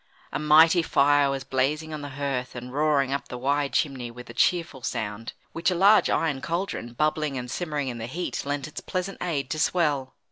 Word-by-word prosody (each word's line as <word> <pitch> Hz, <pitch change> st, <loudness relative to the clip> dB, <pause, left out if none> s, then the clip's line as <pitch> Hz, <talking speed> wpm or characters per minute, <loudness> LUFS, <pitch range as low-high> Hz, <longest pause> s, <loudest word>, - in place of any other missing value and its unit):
A -, -, -2 dB
mighty 160 Hz, +3 st, +6 dB
fire 145 Hz, -2 st, +3 dB
was 135 Hz, -1 st, -2 dB
blazing 150 Hz, +5 st, -1 dB
on 150 Hz, -, -5 dB
the 145 Hz, -, -6 dB
hearth 135 Hz, -3 st, -2 dB
and 125 Hz, +1 st, -7 dB
roaring 145 Hz, -2 st, +2 dB
up 140 Hz, -, -3 dB
the 125 Hz, -, -6 dB
wide 140 Hz, +2 st, 0 dB
chimney 130 Hz, -5 st, 0 dB
with 120 Hz, 0 st, -10 dB
a -, -, -12 dB
cheerful 165 Hz, -5 st, +1 dB
sound, 110 Hz, -1 st, -4 dB, 0.2 s
which 165 Hz, -, +1 dB
a 180 Hz, -, 0 dB
large 200 Hz, +4 st, +5 dB
iron 145 Hz, -5 st, 0 dB
cauldron, 170 Hz, -7 st, -3 dB
bubbling 150 Hz, +1 st, 0 dB
and 125 Hz, -1 st, -5 dB
simmering 150 Hz, -5 st, -2 dB
in 120 Hz, -2 st, -4 dB
the 115 Hz, -, -4 dB
heat, 175 Hz, +8 st, -3 dB
lent 145 Hz, 0 st, -3 dB
its 155 Hz, -, -7 dB
pleasant 185 Hz, +1 st, -4 dB
aid 145 Hz, -7 st, -2 dB
to 155 Hz, -, -2 dB
swell. 150 Hz, -6 st, +1 dB
145 Hz, 205 wpm, -26 LUFS, 130-160 Hz, 0.2 s, mighty